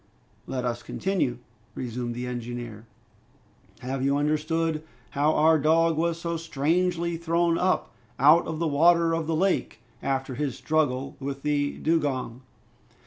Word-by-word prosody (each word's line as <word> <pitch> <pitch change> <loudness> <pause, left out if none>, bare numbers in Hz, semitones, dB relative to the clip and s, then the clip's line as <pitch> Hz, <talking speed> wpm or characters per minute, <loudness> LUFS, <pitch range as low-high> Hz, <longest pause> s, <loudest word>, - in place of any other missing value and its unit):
"Let 125 -1 -3
us 120 -1 -2
continue," 185 -10 -1 0.4
resumed 120 -1 -4
the 125 +1 -4
engineer. 120 -2 -6 0.9
"Have 130 +1 -3
you 140 +1 +2
understood 155 +2 0 0.3
how 145 +2 +2
our 160 +1 +5
dog 165 +2 +3
was 165 +1 0
so 170 0 -2
strangely 165 +2 0
thrown 170 0 +1
up 185 +1 0 0.2
out 150 +6 +5
of 160 - -3
the 165 +1 0
water 165 +3 +4
of 165 -1 -1
the 165 - 0
lake, 185 - 0 0.2
after 135 -1 -2
his 135 0 -3
struggle 140 -4 0
with 140 0 -5
the 145 -1 0
dugong?" 140 -7 -1
150 Hz, 140 wpm, -26 LUFS, 130-165 Hz, 0.9 s, our